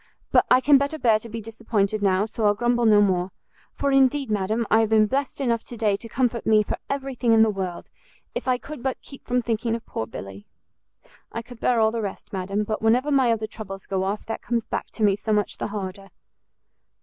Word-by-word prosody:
but - - +4
I 255 - +6
can 280 +1 +6
better 285 +3 -2
bear 225 -7 +3
to 230 - -10
be 230 +1 -5
disappointed 215 -2 -1
now, 195 0 +2
so 220 0 -1
I'll 205 - +3
grumble 240 +1 +2
no 210 -1 +6
more; 185 -2 +1 0.5
for 280 - 0
indeed, 270 -1 +3
madam, 215 +3 0
I 220 - +6
have 220 -1 +2
been 220 -1 +5
blessed 270 +6 -2
enough 235 -4 0
to 240 - -9
day 210 -2 +2
to 230 - -10
comfort 240 -1 0
me 215 -1 +5
for - - -4
every 275 -1 -3
thing 240 -2 +2
in 220 0 +6
the 220 - +3
world, 185 -3 -5 0.4
if - - -5
I 255 -1 +3
could 295 +1 -9
but 265 0 -2
keep 275 - -13
from 250 0 +1
thinking 230 0 -1
of 230 - -7
poor 110 - -4
Billy! 100 +1 -9 0.8
I 230 - -5
could 240 0 -13
bear 240 -1 +2
all 220 0 +4
the 230 0 -2
rest, 200 -1 -6
madam, 195 +2 -1
but 215 +1 -3
whenever 245 +6 +2
my 265 -4 +4
other 220 -1 0
troubles 200 -3 -8
go 190 -1 -1
off, 200 +2 -3
that 225 - -5
comes 235 -2 -1
back - - -3
to 220 - -4
me 200 -2 +4
so 215 +2 -4
much 210 -1 0
the - - -2
harder!" 195 -1 -6
225 Hz, 235 wpm, -24 LUFS, 205-245 Hz, 0.8 s, I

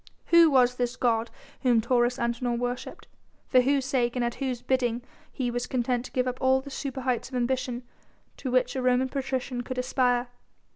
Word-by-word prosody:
Who 335 -1 +8
was 250 -3 +4
this 245 0 -1
god 230 -2 +1 0.3
whom 245 -3 +4
Taurus 240 +1 +2
Antinor 235 0 -1
worshipped? 245 +1 -4 0.4
for 255 - +4
whose 275 +1 +1
sake 250 -3 0
and 245 -1 0
at 235 - -1
whose 255 -3 -2
bidding 245 -2 0 0.3
he 245 -2 -2
was 245 +1 -3
content 245 -1 -1
to - - -9
give 255 0 0
up 250 0 -4
all 260 0 +4
the 280 +1 -10
superheights 265 -3 -2
of 260 - -7
ambition 250 0 -1 0.5
to 260 - -4
which 250 0 +1
a 260 - -1
Roman 255 +1 +2
patrician 260 -2 -3
could 255 +1 -6
aspire? 250 -1 +1
250 Hz, 185 wpm, -27 LUFS, 245-260 Hz, 0.5 s, Who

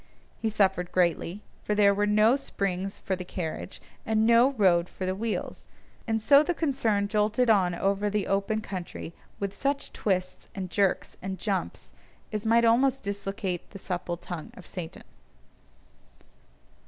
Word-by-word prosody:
He 225 - +1
suffered 190 -4 +1
greatly, 180 +2 0 0.2
for 210 - 0
there 200 -1 +5
were 205 +1 +1
no 215 +4 +5
springs 195 -7 -3
for 190 - -2
the 180 - -6
carriage, 175 0 -5 0.2
and 220 0 +2
no 235 +4 +5
road 180 -7 +3
for 185 - -5
the 185 - 0
wheels; 220 +3 -4 0.4
and 225 0 +1
so 280 +6 +6
the 340 +3 -1
concern 230 -10 +1
jolted 215 +3 +2
on 185 -4 +3
over 200 +3 0
the 205 -1 -1
open 200 +2 0
country 180 -4 -6 0.3
with 200 -1 -2
such 280 +3 -2
twists, 185 -3 -2
and 185 -2 -5
jerks, 200 -3 0
and 190 0 -4
jumps, 195 0 -3 0.4
as 215 +1 -2
might 230 +1 +5
almost 260 +3 +3
dislocate 200 -2 -4
the 200 - -9
supple 175 -2 -4
tongue 170 -2 -7
of 185 - -11
Satan. 175 -3 -7
200 Hz, 155 wpm, -27 LUFS, 185-220 Hz, 0.4 s, so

